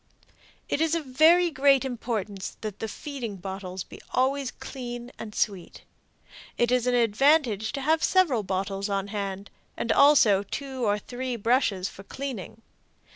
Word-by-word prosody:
It 290 - -1
is 325 0 +2
of 325 -3 -2
very 330 +6 +5
great 275 -2 +4
importance 220 -6 -4
that 215 -3 -6
the 225 - -3
feeding 245 -2 -6
bottles 190 -1 -6
be - - -13
always 270 +1 +1
clean 245 -2 -7
and 215 -2 -8
sweet. 195 -4 -2 0.7
It 240 0 +2
is 250 -1 +2
an 250 - +3
advantage 235 -1 +3
to 275 - -3
have 315 +4 +2
several 335 - +3
bottles 195 +1 -3
on 200 0 -2
hand, 200 -1 -4 0.3
and 230 - -1
also 255 -9 +6
two 260 +3 -4
or 205 0 +2
three 250 +3 -5
brushes 225 -4 +1
for 195 - -11
cleaning. 225 -1 -7
240 Hz, 150 wpm, -26 LUFS, 200-275 Hz, 0.7 s, also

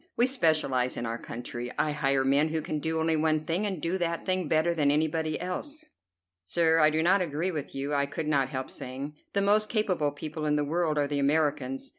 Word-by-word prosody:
We 240 - +5
specialize 155 - +1
in 120 - -3
our 115 0 -3
country. 120 +1 -6
I 155 - +1
hire 135 -2 +1
men 140 +3 +3
who 160 -1 -2
can 155 0 -3
do 160 +1 -1
only 160 0 +2
one 155 0 +1
thing, 180 +6 0
and 190 -4 -3
do 170 +4 -1
that 170 -1 -2
thing 185 -3 0
better 160 +3 +2
than 150 -4 +2
anybody 155 +1 0
else." 290 - -5 0.6
"Sir, 160 - +2
I 155 -1 +6
do 155 +1 0
not 190 +3 +4
agree 170 +2 -1
with 150 -5 -5
you," 140 +2 -3
I 140 0 +1
could 155 +2 -4
not 140 -3 +2
help 130 0 -4
saying. 135 +3 -6 0.2
"The 200 - +2
most 215 +1 +3
capable 185 -9 +1
people 155 +1 -5
in 150 - +2
the 150 0 +1
world 160 0 0
are 145 - +2
the 145 0 -1
Americans. 140 -2 0
155 Hz, 220 wpm, -28 LUFS, 140-170 Hz, 0.6 s, I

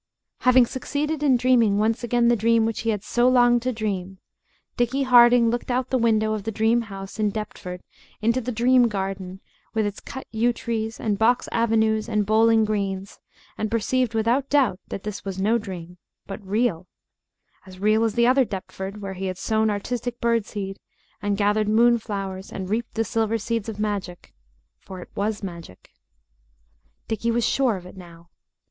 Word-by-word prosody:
Having 255 -1 +5
succeeded 290 +5 -3
in 275 -4 +4
dreaming 235 -5 +3
once 220 +3 0
again 240 0 +2
the 240 - +4
dream 230 +1 +3
which 225 -1 -2
he 230 - -2
had 210 -2 -1
so 240 +3 +2
longed 245 -1 +4
to 255 +2 -1
dream, 195 -5 -4 0.6
Dickie 245 +3 0
Harding 240 -2 +6
looked 240 +2 -3
out 250 +1 0
of - - -40
the 260 - +2
window 220 -2 +2
of 215 - -3
the 225 +3 -4
dream 225 +3 +2
house 195 +1 -8
in 210 -1 +2
Deptford 195 -4 -6 0.4
into 230 +4 +1
the 250 +1 -4
dream 245 +2 +4
garden 190 -2 -4 0.3
with 220 -1 +1
its 205 0 -4
cut 265 -1 -8
yew 235 +2 +1
trees 225 -1 -4
and 210 -3 -1
box 235 +3 +2
avenues 220 -1 +1
and 210 -2 +1
bowling 220 +1 +4
greens, 200 -2 -3 0.4
and 215 - -1
perceived 230 +2 0
without 235 +5 +1
doubt 265 -10 +2
that 195 - -6
this 210 -1 -6
was 195 -1 -5
no 220 +4 +2
dream, 180 -3 -8 0.3
but 200 +1 -8
real 195 -3 -1 0.8
as 185 0 -12
real 215 +3 +2
as 225 -2 0
the 235 0 +4
other 260 +2 +4
Deptford 195 -1 -6
where 195 -1 -4
he 190 +1 -4
had 185 -1 -4
sown 220 +2 +1
Artistic 240 +4 -3
Bird 230 -2 +1
Seed 195 -2 -6 0.4
and 205 0 -1
gathered 210 +1 +1
moonflowers 215 -4 +1
and 190 0 -6
reaped 230 +2 -2
the 225 - +1
silver 225 0 0
seeds 225 0 -3
of 215 - -6
magic, 200 -4 -4 0.5
for 190 -1 -10
it - - -11
was 210 +1 -2
magic. 170 - -9 1.2
Dickie 225 +1 -2
was 235 0 +1
sure 260 -5 +2
of 180 - -11
it 180 - -12
now. 170 -2 -14
220 Hz, 180 wpm, -24 LUFS, 200-235 Hz, 1.2 s, Harding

